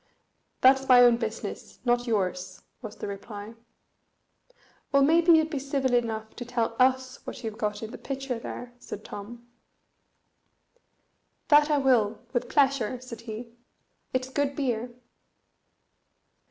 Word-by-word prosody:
"That's 265 +1 +5
my 250 -1 +8
own 240 -1 +6
business, - - -5
not 245 0 +2
yours," 185 -4 -2 0.2
was 220 -3 -8
the - - -6
reply. 205 +2 -7 1.4
"Well, 280 -1 +5
maybe 335 +4 +5
you'd 315 0 +4
be 290 - -2
civil 275 -2 -1
enough 220 -2 -1
to 245 - -4
tell 235 -2 -2
us 260 0 +2
what - - -7
you've 220 -1 -5
got 210 0 -2
in 220 - -6
the - - -9
pitcher 270 -3 -4
there?" 245 +1 -7
said 210 - -8
Tom. 235 +4 -9 2.0
"That 295 0 +6
I 300 - +3
will, 235 -6 +3 0.2
with 245 - -1
pleasure," 270 -4 +2
said 240 -2 -9
he; 230 +2 -7 0.6
"it's 255 0 -1
good 280 +1 -1
beer." 245 -4 -1
245 Hz, 135 wpm, -27 LUFS, 220-270 Hz, 2.0 s, my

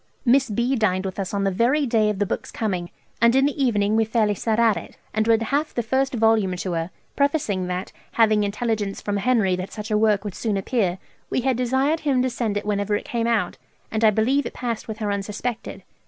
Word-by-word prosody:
Miss 260 +1 +4
B. 235 +5 0
dined 195 -5 +1
with 190 +1 -5
us 190 -2 -3
on 200 -1 -1
the 195 - +1
very 245 +9 +2
day 225 -3 +2
of 210 - -2
the 205 - +1
book's - - -4
coming, 185 -6 -3 0.3
and 235 +1 +5
in 270 +1 +4
the 285 -1 0
evening 210 -4 +2
we 225 - +4
fairly 220 -1 +1
set 220 +2 -1
at 225 -3 +4
it, - - -8 0.2
and 215 +1 0
read 230 0 +4
half 290 +6 -1
the 240 - 0
first 265 +3 0
vol. 225 -1 +4
to 180 +1 -4
her, 165 0 -2 0.3
prefacing 280 - 0
that, 180 +1 -4 0.2
having 215 -2 +4
intelligence 205 -1 -2
from 205 -1 -2
Henry 205 -3 +2
that 185 +1 -5
such 215 0 -7
a 210 - +3
work 210 -2 +3
would 205 -3 -5
soon 215 0 -1
appear, 195 -3 0 0.3
we - - 0
had 260 0 +1
desired 265 +6 +1
him 270 -5 +1
to 255 - 0
send 225 -3 -1
it 205 - -4
whenever 205 0 0
it - - -3
came 235 -1 -1
out, 220 -7 0 0.3
and 220 0 -1
I 220 - +7
believe 245 +7 +1
it - - -8
passed 235 -3 -4
with 220 -1 -5
her 210 -2 -2
unsuspected. 210 +4 -4
220 Hz, 230 wpm, -23 LUFS, 200-245 Hz, 0.3 s, I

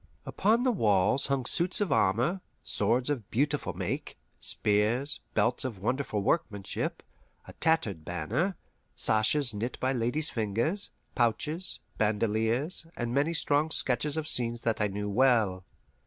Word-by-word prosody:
Upon 225 +4 +1
the 255 - +3
walls 105 - +2
hung 135 -2 -1
suits 175 +7 +2
of 205 -3 0
armour, 120 - +2 0.2
swords 120 +7 +1
of 120 -7 -4
beautiful 145 +5 0
make, - - -4 0.2
spears, 110 +7 +2 0.2
belts 125 - +2
of 125 -6 -4
wonderful 110 0 -2
workmanship, 100 - -2 0.4
a - - -10
tattered 115 - 0
banner, 90 - -2 0.4
sashes 120 +4 +3
knit 115 +5 -4
by 130 +1 0
ladies' 125 +6 0
fingers, 115 - 0 0.2
pouches, 150 +10 -1 0.2
bandoleers, 110 - 0
and 120 0 -3
many 145 +5 +1
strong 150 0 +2
sketches 150 +1 +1
of 155 -1 -3
scenes 120 -3 -1
that 115 -2 0
I 105 - +2
knew 105 +1 -4
well. 105 -4 +2
120 Hz, 135 wpm, -29 LUFS, 105-150 Hz, 0.4 s, the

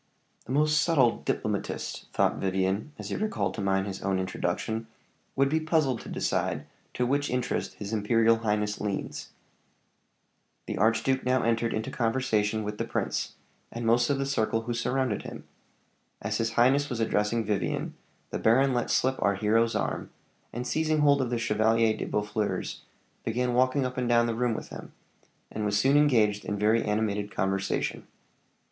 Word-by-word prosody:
"The - - -8
most 150 +2 +3
subtle 135 -7 +3
diplomatist," - - -3
thought - - +1
Vivian, 95 +6 -1
as - - -7
he - - -2
recalled 105 - -1
to - - -5
mind 95 0 +1
his 95 -2 -6
own 95 -1 0
introduction, 110 +4 -2 0.5
"would 135 0 +3
be 155 +3 +1
puzzled 155 -6 +1
to - - -10
decide - - -1 0.3
to 125 - +1
which 145 +3 0
interest 125 -1 -2
his 105 +1 -6
imperial 115 +2 +3
highness 105 -2 -1
leans." 105 -2 -4 1.4
The - - -4
archduke 115 +5 +2
now 125 0 +2
entered 115 0 +1
into 110 - -3
conversation 115 -3 0
with 105 0 -5
the - - +1
prince, - - -2 0.4
and 115 0 -5
most 120 +4 +3
of 140 - +2
the 135 - -1
circle 115 -4 0
who 120 +1 -3
surrounded 125 -1 0
him. - - -8 0.8
As 105 +1 -2
his 115 0 -1
highness 135 +5 +3
was 120 -3 -3
addressing 110 0 +1
Vivian, 105 -1 -1 0.4
the - - -2
baron 130 +4 +4
let 120 -1 -1
slip 130 +1 +1
our 100 0 +2
hero's 110 +3 +2
arm, - - -2 0.4
and 120 +1 -4
seizing 155 +3 +1
hold 140 -1 +4
of 125 - -1
the 120 - 0
Chevalier 110 0 +2
de - - -4
Boeffleurs, 105 0 -2 0.4
began 125 +2 0
walking 130 +2 +2
up 125 0 -4
and 125 -1 -1
down 120 0 +4
the 115 - -1
room 120 0 0
with - - -7
him, - - -10 0.6
and 110 - -3
was 100 -1 +1
soon 135 +7 +3
engaged 115 -9 +3
in 105 - -3
very 110 +3 +3
animated 105 -1 -1
conversation. 95 -1 -2
115 Hz, 170 wpm, -28 LUFS, 105-130 Hz, 1.4 s, baron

